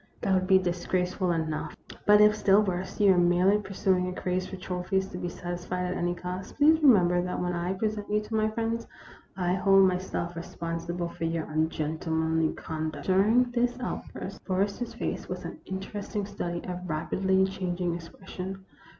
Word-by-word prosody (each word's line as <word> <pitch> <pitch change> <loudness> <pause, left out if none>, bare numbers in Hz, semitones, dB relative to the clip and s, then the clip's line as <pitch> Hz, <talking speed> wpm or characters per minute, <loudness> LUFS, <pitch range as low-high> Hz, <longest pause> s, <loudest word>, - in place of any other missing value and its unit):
That 195 - +1
would 185 0 +2
be 190 -1 +7
disgrace 180 0 -1
ful 185 -3 0
enough; 160 -2 -2 0.3
but 210 0 +7
if, 210 0 +6
still 205 0 +4
worse, 185 0 -3
you 200 -2 +6
are 180 - +3
merely 180 +4 +4
pur 195 -1 -8
suing 185 -2 +2
a 180 - -5
craze 185 0 -1
for - - -7
trophies 185 +1 -1
to 180 - -6
be 175 - -3
satisfied 175 +1 -4
at 180 - -1
any 175 0 -1
cost, 180 +2 -6
please 315 +2 +5
remember 180 - +5
that 180 0 -3
when 180 0 -1
I 175 +2 -1
present 210 +1 -2
you 210 0 +2
to 210 +1 -8
my 215 0 +2
friends, 230 +1 -2 0.5
I 180 -1 +1
hold 195 0 +5
myself 180 -2 -2
responsible 170 +1 -4
for 165 - -4
your 165 -1 -1
ungentle 155 +1 -2
manly 160 0 +1
conduct." 155 -1 -5
During 220 +6 +4
this 245 0 +1
outburst 250 - -6
Forrester's 200 +5 -1
face - - -4
was - - -5
an - - -7
interesting 200 +2 -4
study 175 -4 -4
of 180 -1 -5
rapidly 190 +4 +1
changing 180 -2 -2
expression. 190 +2 -7
185 Hz, 180 wpm, -28 LUFS, 175-200 Hz, 0.5 s, be